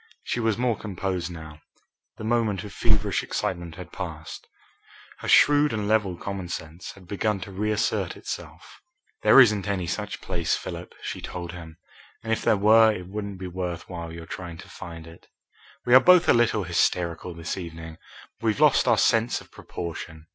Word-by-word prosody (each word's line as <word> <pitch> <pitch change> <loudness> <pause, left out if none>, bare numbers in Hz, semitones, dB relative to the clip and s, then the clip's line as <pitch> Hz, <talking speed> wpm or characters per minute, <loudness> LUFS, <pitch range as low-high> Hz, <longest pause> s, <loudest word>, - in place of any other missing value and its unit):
She - - -2
was 110 -3 +1
more 120 -2 +1
composed 95 -4 -3
now. 80 -3 -10 0.6
The - - -8
moment 110 -4 0
of 105 - -9
feverish - - +1
excitement 85 -3 -3
had 90 - -10
passed. 80 -5 -7 0.7
Her - - -7
shrewd 145 0 +6
and 105 -2 -2
level 105 -5 +1
common 95 -2 -5
sense 80 0 -7
had 95 -2 -16
begun 105 +2 -1
to 100 - -7
reassert 105 +3 -1
itself. - - -8 0.4
"There - - +7
isn't 105 -6 +5
any 95 -3 -1
such 105 +4 -4
place, 85 -4 -1
Philip," - - -7
she - - -5
told 85 -1 -6
him, 85 -2 -10 0.5
"and 115 0 0
if - - -1
there 110 -3 +3
were 110 +2 +6
it 90 -4 -6
wouldn't 100 -1 -5
be 95 - -7
worth 90 -1 -4
while 85 -2 -6
your 85 0 -8
trying 90 -4 -7
to - - -17
find 85 -3 -9
it. 80 0 -15 0.6
We 120 - +3
are 130 - +11
both 180 +5 +6
a - - +7
little 115 -3 +2
hysterical 85 0 0
this 85 +1 -4
evening. 80 -3 -8 0.4
We've 110 -3 0
lost - - +5
our - - +5
sense 115 +1 +3
of - - -16
proportion. 80 -2 -7
95 Hz, 175 wpm, -25 LUFS, 85-110 Hz, 0.7 s, are